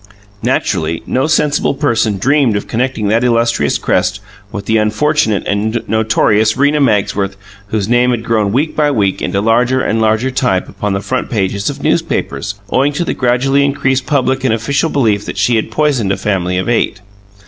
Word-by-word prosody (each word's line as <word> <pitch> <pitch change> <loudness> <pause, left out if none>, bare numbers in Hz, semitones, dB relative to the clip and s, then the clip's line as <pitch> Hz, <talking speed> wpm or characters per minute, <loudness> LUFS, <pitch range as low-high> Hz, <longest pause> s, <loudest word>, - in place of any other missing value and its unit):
Naturally, 80 +1 -1
no 130 +4 0
sensible 150 -2 +1
person 115 -7 0
dreamed 135 +1 +2
of 105 - -3
connecting 120 -3 -1
that 115 +3 +2
illustrious 115 - +1
crest 100 - 0 0.3
with 100 -1 -6
the 110 +2 +2
unfortunate 110 +1 +1
and 110 +3 -1
notorious 110 0 +2
Rena 145 +2 +2
Magsworth 100 -5 0 0.3
whose 105 -1 -2
name 120 +2 +3
had 120 -2 -1
grown 110 -4 0
week 145 +8 0
by 150 -1 +2
week 105 -8 0
into 100 - -1
larger 120 +4 +2
and 115 -3 0
larger 110 +4 +1
type 125 -8 0
upon 105 -1 -3
the 95 - -2
front 100 - -3
pages 100 -2 -1
of - - -7
newspapers, 70 +9 -1 0.2
owing 140 +3 +2
to 170 +4 -2
the - - -1
gradually 135 +3 +1
increasing 135 -2 0
public 130 -2 0
and 125 -4 +2
official 140 +8 -1
belief 110 -9 +1
that - - -6
she 120 - +2
had 110 - -1
poisoned 125 -5 0
a - - 0
family 90 -3 -1
of 95 - -2
eight. 115 -4 0
115 Hz, 180 wpm, -14 LUFS, 105-130 Hz, 0.3 s, name